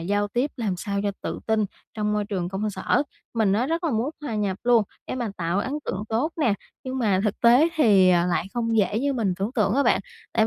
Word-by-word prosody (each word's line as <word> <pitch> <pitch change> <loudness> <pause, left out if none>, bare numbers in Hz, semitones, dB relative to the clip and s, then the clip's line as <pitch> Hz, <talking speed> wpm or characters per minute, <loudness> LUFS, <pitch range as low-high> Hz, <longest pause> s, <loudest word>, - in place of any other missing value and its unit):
giao 205 +4 0
tiếp 250 +7 0
làm 215 -6 -1
sao 200 +1 -2
cho 205 - 0
tự - - -3
tin 220 -1 +2 0.3
trong 210 -1 -1
môi 210 0 0
trường 190 -4 -3
công 200 +3 -2
sở. 190 +7 +1 0.3
Mình 220 -4 +2
á, 230 +6 +1
rất 335 +3 -1
là 325 - +1
muốn 235 +4 0
hòa 245 -7 -3
nhập 200 -3 -1
luôn 240 -2 +5 0.2
để - - -3
mà 240 -4 -2
tạo 170 +2 -1
ấn 260 +6 -2
tượng 190 +2 -3
tốt 245 +9 0
nè, 235 -9 +3 0.3
nhưng 260 0 -3
mà 200 -6 +2
thực 210 - -1
tế 245 +7 +6
thì, 205 -11 +5
à, 175 0 +3
lại 175 0 0
không 230 -1 0
dễ 210 0 +2
như 280 +3 0
mình 225 -7 0
tưởng 200 +6 -2
tượng 210 -2 +2
á 280 - +3
bạn - - +3 0.3
tại 220 - +3
215 Hz, 245 wpm, -24 LUFS, 200-245 Hz, 0.3 s, tế